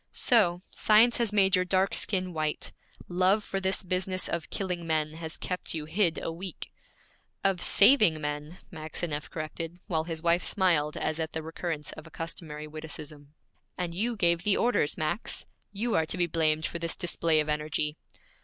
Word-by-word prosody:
'So! 180 -8 +3
Science 225 +3 +5
has 230 -3 +1
made 195 -2 +4
your 185 - +2
dark 190 +1 +1
skin 185 -3 +1
white; 155 -1 -2 0.3
love 185 +4 +2
for 195 - -2
this 190 +1 -1
business 185 0 -1
of 170 -1 -3
killing 180 -4 -3
men 155 -1 +1
has 160 0 -5
kept 180 -2 -3
you 155 -2 -4
hid 170 +1 +1
a - - -2
week.' 175 0 -7 0.7
'Of 195 -3 +2
saving 205 - +6
men,' 150 +3 -4
Maxineff 155 -2 -4
corrected, 165 +2 -5
while 160 -3 -1
his 165 -1 -5
wife 170 +1 +3
smiled 165 -6 +2
as 155 +1 -1
at 160 -1 -3
the 160 - -3
recurrence 160 -2 -4
of 155 - -10
a - - -12
customary 160 -2 -6
witticism. 150 -1 -8 0.4
'And 175 -2 -3
you 230 +7 0
gave 170 -4 +2
the 200 +2 +3
orders, 235 -11 +1
Max! 155 +8 -2 0.3
You 225 +3 -2
are 160 - +2
to 175 - -2
be 175 - +2
blamed 160 -1 +1
for 170 - -4
this 170 -1 -2
display 165 -2 +2
of 150 - 0
energy.' 150 0 -1
170 Hz, 175 wpm, -28 LUFS, 155-185 Hz, 0.7 s, saving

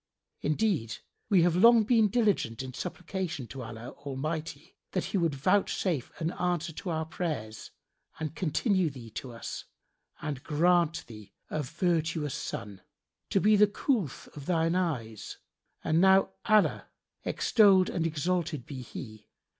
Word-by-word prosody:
[FN#75] - - 0
Indeed, 155 - 0 0.3
we 195 -5 +5
have 170 -1 +3
long 230 +4 +7
been 225 -1 +4
diligent 200 - +1
in 130 -1 -7
supplication 180 -3 -4
to 130 +4 -8
Allah 115 0 -7
Almighty 145 +3 -5 0.2
that - - 0
He 205 - -2
would 165 -4 +1
vouchsafe 180 -2 +1
an 165 +1 -1
answer 175 -3 -1
to 180 - -6
our 160 -1 -1
prayers 145 -11 -4 0.5
and 155 -1 -3
continue 185 - +1
thee 125 -5 -10
to 125 +3 -6
us 115 - -7 0.5
and 145 -4 -4
grant 170 +1 +2
thee 105 -3 -12 0.2
a 155 - -1
virtuous 160 0 -1
son, 100 -2 -5 0.5
to - - +3
be 210 +2 +5
the 210 0 +6
coolth 205 - -1
of 145 -1 -9
thine 165 -1 +2
eyes: 125 - -2 0.5
and 160 +2 +2
now 190 0 +5
Allah 215 -2 +3 0.4
(extolled 195 -4 +4
and 165 -2 -1
exalted 160 -3 -1
be 135 -3 -7
He!) 110 -3 -9
165 Hz, 145 wpm, -29 LUFS, 135-185 Hz, 0.5 s, long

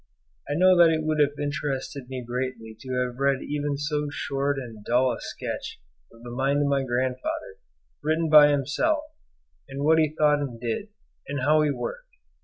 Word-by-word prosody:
I 145 - 0
know 185 +3 +5
that 170 -1 +7
it 160 -1 0
would 155 -1 0
have 145 0 +2
interested 140 -2 -3
me 130 -1 -5
greatly 120 -2 -4
to 125 +1 -2
have 125 0 -8
read 140 -1 +1
even 145 -1 -2
so 150 0 -2
short 140 0 -2
and 115 -5 -8
dull 125 +3 +2
a - - -5
sketch - - -6 0.3
of 115 - -17
the 120 - -8
mind 135 +3 +1
of - - +1
my 140 -1 +2
grandfather, 130 - -2 0.5
written 155 +2 +1
by 150 -1 +8
himself, 150 - +1 0.7
and 135 +1 -5
what 160 +2 +5
he 155 -1 +1
thought 150 -1 +4
and 130 -5 -5
did, 120 - -3 0.4
and 140 -1 -3
how 155 +4 +4
he 150 - +2
worked. - - -5
145 Hz, 185 wpm, -25 LUFS, 130-155 Hz, 0.7 s, by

